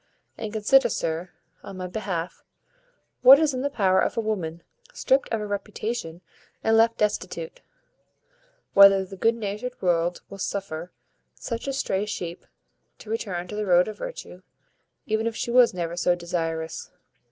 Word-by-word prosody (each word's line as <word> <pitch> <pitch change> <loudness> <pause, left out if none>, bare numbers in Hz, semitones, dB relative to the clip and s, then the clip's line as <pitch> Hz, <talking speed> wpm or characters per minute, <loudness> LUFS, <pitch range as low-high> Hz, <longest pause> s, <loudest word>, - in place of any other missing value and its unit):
And 215 - -5
consider, 240 +4 +4
sir, 165 -2 -2 0.3
on 195 - -9
my 185 - -4
behalf, 180 -3 -4 0.8
what 265 +2 +10
is 305 -2 +1
in 255 - -2
the 285 - 0
power 190 -8 +2
of - - -1
a - - +3
woman 180 -7 -3 0.3
stript 270 - +1
of 225 - -1
her 210 - -4
reputation 205 -3 -4 0.4
and 225 - +3
left 230 +1 +4
destitute; 485 - -2 1.1
whether 195 -1 +7
the 195 - -10
good 225 +5 +2
natured 225 +3 -5
world 175 -1 0
will 195 - -11
suffer 180 -3 -4 0.4
such 230 +2 -5
a - - 0
stray 210 -7 -1
sheep 175 -4 -6 0.5
to 215 - -10
return 185 -6 -3
to - - -6
the 210 -1 -3
road 180 0 +5
of 215 - -7
virtue, - - -8 0.6
even 220 +1 0
if 230 - -3
she 235 - -3
was 245 -1 +6
never 170 -3 -4
so 175 0 +2
desirous. 165 -2 -4
205 Hz, 160 wpm, -25 LUFS, 175-230 Hz, 1.1 s, what